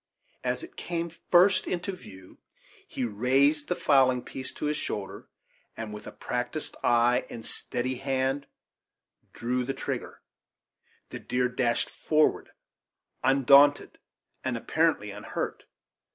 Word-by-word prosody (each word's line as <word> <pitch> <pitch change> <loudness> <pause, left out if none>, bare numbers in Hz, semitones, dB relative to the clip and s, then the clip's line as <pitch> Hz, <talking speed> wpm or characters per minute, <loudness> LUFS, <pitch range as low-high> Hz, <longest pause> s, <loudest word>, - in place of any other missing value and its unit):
As - - -1
it 365 +3 -11
came 170 -1 -3 0.2
first 185 +2 +5
into 180 +2 -2
view 95 - -13 0.5
he 130 - -3
raised 135 +7 +2
the 180 - 0
fowling 130 -5 +3
piece 130 - -7
to - - -5
his 150 +1 0
shoulder 100 -8 -5 0.5
and, 110 -2 -5
with 105 - -9
a - - -6
practised 125 +5 -3
eye 120 +1 +3
and 115 -1 -8
steady 125 +1 -3
hand, 135 +1 -1 0.8
drew 125 +2 -2
a 135 +2 -2
trigger. - - -5 0.9
The - - -6
deer 125 0 0
dashed 120 -1 0
forward 155 0 +1 0.7
undaunted, 140 +2 +5 0.4
and - - -1
apparently - - +1
unhurt. - - -5
130 Hz, 125 wpm, -28 LUFS, 120-150 Hz, 0.9 s, first